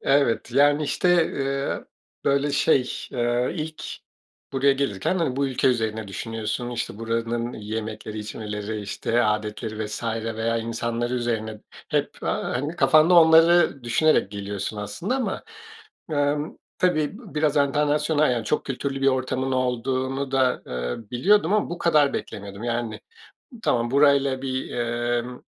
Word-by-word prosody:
Evet, 135 -4 +2
yani, 145 +3 +4
işte, 175 +3 +3
eee, 140 0 -2 0.4
böyle, 140 +1 +2
şey, 135 -3 +3 0.2
eee, 120 0 0
ilk 155 -1 -5 0.7
buraya 135 +1 +4
gelirken, 135 - -1
hani, 150 -7 0
bu 140 0 +1
ülke 130 0 +1
üzerine 110 -3 -1
düşünüyorsun. 115 +3 -4
İşte, 115 -3 -4
buranın 115 +1 -2
yemekleri, 110 0 -5
içmeleri, 105 0 -5
işte, 105 +4 0
âdetleri 110 +1 -2
vs. 105 - -6 0.3
veya 115 +1 0
insanları 115 +1 -2
üzerine 110 -3 -2 0.3
hep, - - 0
aaa, - - -1
hani, 145 +7 -3
kafanda 160 +1 +5
onları 165 -4 +6
düşünerek 120 -2 +3
geliyorsun 100 0 -4
aslında 105 - -3
ama, 230 -8 -2 0.7
emm, 145 +1 0 0.2
tabii 180 0 +1
b 215 -9 -13
biraz 150 -1 +1
enternasyonal 150 +1 +2
yani 120 -2 -2
çok 150 - 0
kültürlü 135 0 -3
bir - - +3
ortamın 130 0 -1
olduğunu 130 +2 -1
da, 130 -2 +2
eee, 60 0 -3
biliyordum 180 +8 +3
ama 210 -4 +1
bu 175 - -4
kadar 150 -4 +3
beklemiyordum. 100 +2 -6
Yani, 120 -2 -2 0.6
tamam, 120 0 +1
burayla 140 -1 +3
bir, 130 -1 -3
emm, 120 +1 -2
130 Hz, 135 wpm, -24 LUFS, 115-145 Hz, 0.7 s, onları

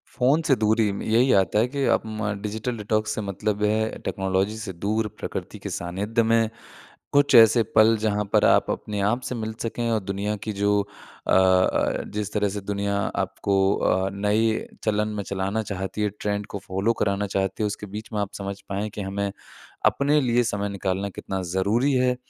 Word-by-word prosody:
Phone 140 +5 +3
से 135 - +5
दूरी 110 -1 +2
में 100 - -5
यही 120 +4 +3
आता 100 +2 +3
है 115 - +3
कि 140 +2 -3
अ, - - +4
म 110 -1 -3
डिजिटल 110 +3 -3
डिटॉक्स 110 +1 -1
से 110 - -2
मतलब 105 +1 -2
ये 105 - +3
है 110 0 -1
टेक्नोलॉजी 95 +2 0
से 100 -4 -6
दूर, 105 +5 -1
प्रकृति - - -5
के - - -6
सानिध्य 100 +7 -1
में, 115 0 +3 0.6
कुछ 140 -1 +4
ऐसे 115 0 +8
पल 110 +1 +6
जहाँ 105 -1 0
पर - - +5
आप, - - +4
अपने 105 -1 -4
आप 115 +6 +1
से 125 - -4
मिल 110 -1 -4
सकें 115 0 -2
और 115 -1 +2
दुनिया 100 +2 -2
की 110 - -1
जो 100 +1 +2 0.5
अ - - 0
अ, 95 0 +3
जिस 105 -1 -3
तरह 105 -1 +1
से 100 +1 -5
दुनिया 100 0 -2 0.2
आपको 100 - -1 0.2
अ, 95 +1 +1
नए 110 +3 +1 0.2
चलन 105 -1 +1
में 100 - -2
चलाना 100 +3 -2
चाहती 95 0 -4
है 105 - +2
ट्रेंड 105 0 -2
को 100 - -6
फॉलो 95 +5 +1
कराना 100 0 0
चाहती 95 +2 -1
है। - - +2
उसके 105 0 -5
बीच 110 +2 -6
में 105 - -1
आप 100 - -4
समझ 100 0 -5
पाएँ 100 +2 -2
कि 105 0 -6
हमें 100 +1 -2 0.5
अपने 145 +2 +3
लिए 120 -2 +2
समय 100 -3 -2
निकालना 100 0 -2
कितना 95 0 -5
ज़रूरी 110 +9 +2
है। 125 -1 +2
105 Hz, 195 wpm, -24 LUFS, 100-110 Hz, 0.6 s, ऐसे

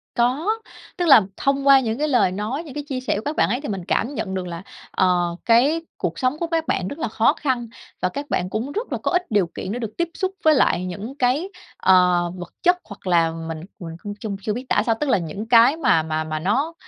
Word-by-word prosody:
Có. 255 +8 +1 0.5
Tức 355 - 0
là 270 -7 +9 0.2
thông 275 0 0
qua 275 -1 +8
những 230 -3 -2
cái 300 +2 0
lời 245 -10 +3
nói, 215 - -3
những 300 -6 -10
cái 295 - -3
chia 265 -3 -3
sẻ 255 - -1
của 205 - -2
các 295 +2 -2
bạn - - +2
ấy 245 +6 -1
thì 295 - -5
mình 190 -4 -4
cảm 245 +9 0
nhận 195 -8 -4
được 185 -1 -3
là, 170 0 -7 0.3
ờ, 175 -2 +1
cái 265 +8 +4 0.2
cuộc 170 -1 -3
sống 255 +4 0
của 340 - -1
các 330 -1 -1
bạn 180 - 0
rất 285 - -7
là - - -1
khó 225 +4 +2
khăn, 255 -7 -2 0.3
và 185 - +1
các 285 +7 -6
bạn 180 - -1
cũng 225 +8 -3
rất 440 +10 -4
là - - -1
có - - 0
ít 360 0 +3
điều 200 -4 +3
kiện 190 - -5
được 225 -1 -4
tiếp 345 -1 0
xúc 375 -1 -2
với 315 - +6
lại 185 -8 +2
những 205 +8 -6
cái, 275 +8 +1 0.3
ờ, 180 -2 +4
vật 175 -1 -9
chất 355 +1 +4
hoặc 205 -6 -11
là 170 -2 +3
mình 165 -1 -6 0.2
mình 165 -3 -7
cũng 205 - -5
chung 215 -4 -4
chưa 210 +2 -2
biết 250 +4 -5
tả 210 - +3
sao. 225 - +2
Tức 295 - -1
là - - +4
những 185 +5 -5
cái 240 +5 +6
mà 255 - +3
mà 155 0 -2
mà 155 0 -4
nó 260 - 0
230 Hz, 255 wpm, -22 LUFS, 185-285 Hz, 0.5 s, là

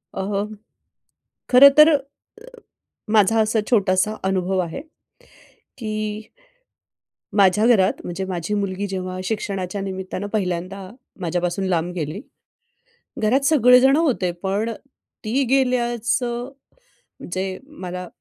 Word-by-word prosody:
अहं, 205 +2 -3 1.0
खरं 270 +3 +9
तर 305 +1 +9
अ, 295 -3 +3 1.1
माझा 220 +1 +4
असा 220 +1 +1
छोटासा 200 -1 +2
अनुभव 190 0 0
आहे, 170 +6 -4 1.0
की 215 -2 -4 1.1
माझ्या 200 +3 +4
घरात 205 -6 +3
म्हणजे 175 +2 -4
माझी 180 +1 -3
मुलगी 200 -1 -2
जेव्हा 185 -1 -4
शिक्षणाच्या 195 -2 -3
निमित्तानं 190 0 -5
पहिल्यांदा 185 -1 -3 0.3
माझ्यापासून 175 +2 -2
लांब 175 0 -1
गेली. 160 +2 -4 1.0
घरात 240 +6 +2
सगळेजण 260 -2 +5
होते 255 - +1
पण 205 +4 -1 0.5
ती 260 +6 +1
गेल्याचं 240 -1 0 0.8
जे 190 0 -3
मला 180 -11 -7
200 Hz, 100 wpm, -21 LUFS, 185-235 Hz, 1.1 s, खरं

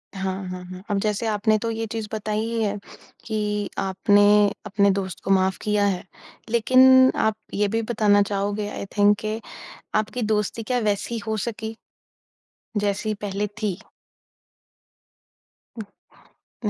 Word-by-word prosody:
हाँ, 190 0 -3
हाँ, 180 0 -6
हाँ। 185 +1 -10
अब 200 -1 +1
जैसे 210 +2 -1
आपने 215 0 +2
तो 230 +2 -3
ये 225 0 -3
चीज़ 225 -2 -3
बताई 215 0 -2
ही 225 +1 -1
है 205 -1 -1 0.5
कि 210 -2 -2
आपने 200 +2 +3 0.4
अपने 200 0 +2
दोस्त 190 -1 -3
को - - -1
माफ़ 190 0 +3
किया 210 -1 +1
है। 190 -3 0 0.5
लेकिन 260 +3 +6
आप 220 -1 +1 0.2
ये 205 +1 +1
भी 225 +3 -1
बताना 215 -3 +3
चाहोगे 205 +1 -1
आई 200 - -6
थिंक 205 0 +5
कि 215 +1 -3 0.6
आपकी 220 +3 -1
दोस्ती 215 +1 -1
क्या 250 +3 -1
वैसी 215 +1 -1
हो 220 0 -1
सकी? 220 -1 -5 1.0
जैसी 205 +1 0
पहले 205 0 -2
थी। 200 -4 -1 2.7
उम, 215 - -6
210 Hz, 140 wpm, -23 LUFS, 200-220 Hz, 2.7 s, लेकिन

